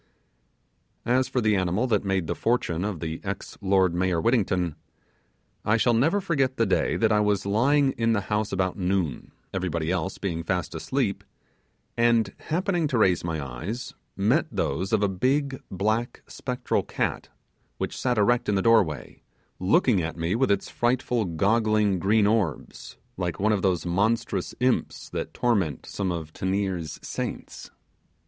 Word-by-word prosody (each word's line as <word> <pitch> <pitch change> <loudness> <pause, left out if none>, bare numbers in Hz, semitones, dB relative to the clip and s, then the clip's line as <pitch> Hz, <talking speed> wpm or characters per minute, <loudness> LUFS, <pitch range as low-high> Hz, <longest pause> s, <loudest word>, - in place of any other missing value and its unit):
As 125 +2 +2
for 125 - -1
the 110 -2 +3
animal 95 +5 +1
that 110 -6 +1
made 95 -3 0
the - - -1
fortune 95 -8 0
of 100 -6 -3
the 80 -1 -4
ex 100 -1 -5
lord 95 -2 +3
mayor 90 -1 +1
Whittington, 95 - +1 0.9
I 110 +2 +3
shall 120 +2 +3
never 150 - +3
forget 135 -9 0
the 115 - +3
day - - +1
that 110 -1 +2
I 105 - +4
was 105 -2 +1
lying 135 +7 +3
in 115 0 +3
the 100 - +1
house 105 +1 -1
about 95 +1 -1
noon, 90 -7 -1 0.2
everybody 85 -3 -1
else 95 0 -2
being 85 -4 -3
fast 90 0 -2
asleep; - - -1 0.7
and 115 -1 +3
happening 175 0 0
to 135 -4 0
raise 95 -6 +3
my 80 -2 -2
eyes, 85 - -5 0.2
met - - +2
those 90 +8 -1
of 110 -2 +2
a - - +4
big 135 +8 0
black 110 +5 -1
spectral 125 -1 -2
cat, - - -3 0.5
which - - -3
sat 125 -2 0
erect 120 +3 +2
in 105 - +2
the 95 - +1
doorway, 105 - +2 0.4
looking 105 - +3
at 80 +1 -4
me 85 +2 -1
with 130 +4 +2
its 100 - +1
frightful 120 -2 0
goggling 105 +2 +2
green 105 +3 +3
orbs, 100 - -1 0.2
like 90 -2 -3
one 105 +2 +2
of 105 -3 +1
those 90 -4 +1
monstrous 105 +7 0
imps 125 0 0
that - - -4
torment 100 - 0
some 95 -2 -2
of 80 -2 -5
Teniers' 95 -4 -2
saints! - - -5
100 Hz, 160 wpm, -26 LUFS, 90-120 Hz, 0.9 s, I